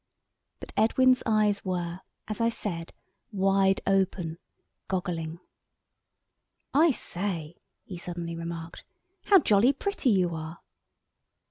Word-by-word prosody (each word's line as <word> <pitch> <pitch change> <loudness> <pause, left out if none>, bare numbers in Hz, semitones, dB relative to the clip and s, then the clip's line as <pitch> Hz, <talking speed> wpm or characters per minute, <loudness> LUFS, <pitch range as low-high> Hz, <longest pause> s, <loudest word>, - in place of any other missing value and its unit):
But - - -10
Edwin's 255 +3 +4
eyes 210 -2 +2
were, 180 -1 -3 0.3
as 215 +1 -3
I 230 - +3
said, 170 -7 -4 0.4
wide 195 -1 +2
open, 190 -4 0 0.5
goggling. 170 -3 -3 1.3
"I 320 +4 +5
say," 175 - -3 0.3
he 180 -3 -8
suddenly 170 -1 -5
remarked, 165 0 -6 0.4
"how 400 - +7
jolly 240 - +4
pretty 395 -2 -1
you 185 -5 +2
are." 160 +1 -6
190 Hz, 105 wpm, -28 LUFS, 170-215 Hz, 1.3 s, how